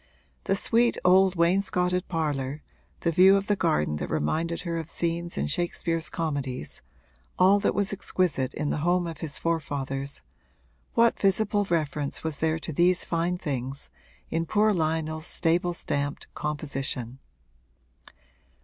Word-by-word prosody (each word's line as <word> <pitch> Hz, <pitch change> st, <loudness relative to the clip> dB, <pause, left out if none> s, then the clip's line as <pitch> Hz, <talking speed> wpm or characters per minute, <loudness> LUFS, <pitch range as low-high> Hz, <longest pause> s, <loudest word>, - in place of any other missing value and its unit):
The 195 Hz, -, +2 dB
sweet 235 Hz, +4 st, +2 dB
old 190 Hz, +1 st, +5 dB
wainscoted 180 Hz, +1 st, +1 dB
parlour, 150 Hz, -4 st, -2 dB, 0.4 s
the 170 Hz, -, +1 dB
view 190 Hz, +4 st, +6 dB
of 195 Hz, -, -2 dB
the 205 Hz, -, +2 dB
garden 75 Hz, -, +1 dB
that -, -, -4 dB
reminded 165 Hz, -, -1 dB
her 170 Hz, -2 st, -2 dB
of 165 Hz, 0 st, -6 dB
scenes 170 Hz, 0 st, -2 dB
in 70 Hz, -, 0 dB
Shakespeare's 165 Hz, -, -1 dB
comedies, 140 Hz, -, -4 dB, 0.6 s
all 195 Hz, +2 st, +5 dB
that -, -, 0 dB
was 205 Hz, 0 st, +1 dB
exquisite 175 Hz, -9 st, 0 dB
in 150 Hz, -, -1 dB
the -, -, -1 dB
home 175 Hz, +3 st, +2 dB
of 165 Hz, -2 st, -6 dB
his 150 Hz, -2 st, -1 dB
forefathers 140 Hz, -4 st, -3 dB, 0.7 s
what 230 Hz, 0 st, +4 dB
visible 205 Hz, +1 st, +2 dB
reference 150 Hz, -5 st, -2 dB
was 160 Hz, -3 st, -3 dB
there 160 Hz, 0 st, +1 dB
to 160 Hz, 0 st, -6 dB
these 175 Hz, +4 st, +3 dB
fine 170 Hz, +1 st, 0 dB
things 135 Hz, -3 st, -4 dB, 0.4 s
in 165 Hz, 0 st, -1 dB
poor 215 Hz, +3 st, +3 dB
Lionel's 160 Hz, -1 st, -1 dB
stable 175 Hz, +1 st, +1 dB
stamped 145 Hz, -3 st, -2 dB
composition? 135 Hz, -4 st, -4 dB
165 Hz, 140 wpm, -27 LUFS, 145-180 Hz, 0.7 s, view